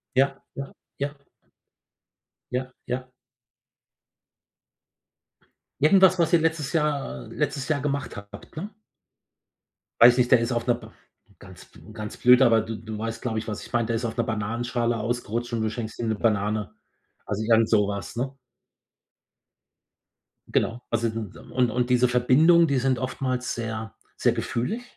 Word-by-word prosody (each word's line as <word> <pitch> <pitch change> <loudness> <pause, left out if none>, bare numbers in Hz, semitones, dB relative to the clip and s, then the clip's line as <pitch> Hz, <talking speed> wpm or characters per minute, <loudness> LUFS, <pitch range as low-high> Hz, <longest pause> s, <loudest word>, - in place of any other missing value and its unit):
Ja, 135 +1 +2
ja, 140 0 -6 0.3
ja. 140 +1 -3 1.4
Ja, 130 +1 -2
ja. 125 +1 -3 2.7
Irgendwas, 185 +3 +6
was 165 -2 +2
ihr 165 - +6
letztes 160 -2 -1
Jahr 145 - -1
äh, - - -10
letztes 135 - -2
Jahr 150 -3 +1
gemacht 140 -1 -2
habt, 100 0 -11
ne? 200 +7 -5 1.3
Weiß 120 +1 +9
nicht, 125 -1 +2
der 125 -3 +6
ist 115 - -1
auf 120 +1 -1
'ner 120 -1 +3
br 110 -2 -13 0.5
ganz - - -14
b - - -20
ganz 105 -1 -7
blöd, 125 +1 +6
aber 115 -4 +5
du 110 0 -5
du 110 -1 -7
weißt, 115 +1 -4
glaube 115 -3 -2
ich, 110 - -4
was 105 -1 -5
ich - - -13
meine. 120 -1 +1
Der 115 0 -1
ist 120 +1 -2
auf 110 - -5
'ner 120 - +1
Bananenschale 115 +2 -1
ausgerutscht 120 +1 -3
und 115 - -1
du 110 - 0
schenkst 110 -1 -6
ihm 115 - -2
'ne 110 - +1
Banane, 105 -1 0 0.5
also 105 +1 -2
irgend 115 0 +4
so 105 -2 +3
was, 100 +3 -5
ne? 130 +3 -2 2.1
Genau. 120 +2 0
Also 115 0 +1
d 110 - -6
n 105 -3 -9
und 125 -2 +2
und 125 +2 -1
diese 125 0 +4
Verbindungen, 150 +8 +5
die 140 -3 +1
sind 130 0 +1
oftmals 130 -1 -2
sehr 110 -2 -5 0.2
sehr - - +2
gefühlig, 205 - -2
120 Hz, 160 wpm, -25 LUFS, 110-135 Hz, 2.7 s, Weiß